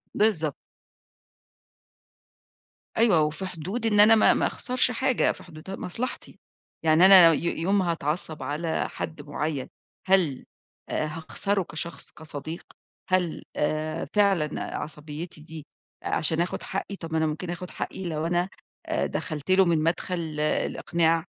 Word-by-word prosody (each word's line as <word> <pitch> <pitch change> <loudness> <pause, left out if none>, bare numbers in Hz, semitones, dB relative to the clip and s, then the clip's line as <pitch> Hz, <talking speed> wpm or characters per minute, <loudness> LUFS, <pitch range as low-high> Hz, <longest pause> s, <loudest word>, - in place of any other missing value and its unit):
بالضبط. 170 -9 +2 2.4
أيوه، 215 -8 +5
وفي 155 +4 -2
حدود، 185 +7 -5
إن 210 -2 +3
أنا 215 +2 +9
ما 215 - +6
ما - - +1
أخسرش 255 -1 +1
حاجة، 260 +1 +1
في - - -11
حدود 160 +2 -11
مصلحتي، 230 +8 -5 0.4
يعني 160 +2 +5
أنا 185 -4 +9
ي 160 - -2 0.2
يوم 195 +4 +2
ما 180 -3 +1
هاتعصب 155 -1 -1
على 155 +4 -2
حد 160 -2 -6
معيّن، 145 -1 -3 0.4
هل 180 -9 +3 0.4
آآ، - - -1
هاخسره 185 +6 0
كشخص، 170 +1 -5
كصديق، 155 +1 -6 0.5
هل 185 -3 0
آآ 155 +1 -1
فعلًا 195 -7 +1
عصبيتي 150 +2 -7
دي 155 -1 -10 0.4
عشان 160 +1 +2
آخد 175 - -3
حقي؟ 195 +1 -4
طب 165 -4 -9
ما 160 - 0
أنا 160 0 +2
ممكن 160 +3 -4
آخد 180 +1 -5
حقي 190 - -5
لو 155 0 -2
أنا 175 +2 0 0.4
آآ، - - -1
دخلت 155 +2 -4
له 190 0 +6
من 165 -3 +2
مدخل 165 -1 -2
الإقناع، 165 +2 +1
165 Hz, 135 wpm, -26 LUFS, 155-190 Hz, 2.4 s, أنا